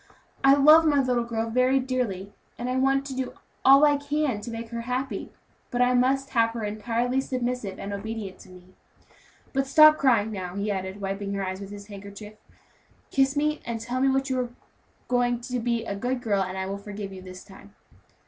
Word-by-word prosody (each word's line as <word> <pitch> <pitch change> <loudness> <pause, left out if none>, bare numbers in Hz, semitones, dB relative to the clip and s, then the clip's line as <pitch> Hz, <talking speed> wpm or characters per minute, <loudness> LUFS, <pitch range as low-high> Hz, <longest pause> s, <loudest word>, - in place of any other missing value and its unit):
I 270 0 +7
love 305 +3 +7
my 295 -3 +3
little 250 -3 +1
girl 225 -1 -3
very 255 +3 +3
dearly, 240 -7 -3 0.2
and 250 +2 -1
want 270 +1 +2
to 275 - -5
do 260 -1 -3 0.3
all 275 +3 +8
I 290 -1 +4
can 285 -5 -1
to 235 - -7
make 230 0 -6
her 235 0 -4
happy, 250 +3 -3 0.4
but 245 - -3
I 250 0 +4
must 270 +2 +2
have 230 -2 +3
her 230 - -4
entirely 230 +5 -1
submissive 250 -6 -3
and 200 +1 -5
obedient 200 -2 -6
to - - -15
me. 185 0 -16 0.8
But 270 0 0
stop 305 +2 +7
crying 230 -6 +3
now," 185 -3 -5
he 205 +1 -1
added, 190 +1 -4
wiping 200 +1 -3
her 195 -1 -2
eyes 185 +1 -5
with 195 - -7
his 200 0 -9
handkerchief. 200 +1 -10 0.8
"Kiss 270 +1 +2
me, 300 +1 0
and 230 -1 -4
tell 245 +3 -3
me 270 - +4 0.2
you 260 -2 -1
are 245 -1 -2 0.6
going 245 -1 +1
to 250 0 -3
be 235 0 -1
a 200 - -3
good 245 +5 -2
girl, 210 -5 0
and 185 0 -3
I 190 - -2
will 195 +1 -4
forgive 200 -1 -7
you 190 - -9
this 185 0 -10
time." 200 +1 -16
235 Hz, 200 wpm, -26 LUFS, 200-260 Hz, 0.8 s, all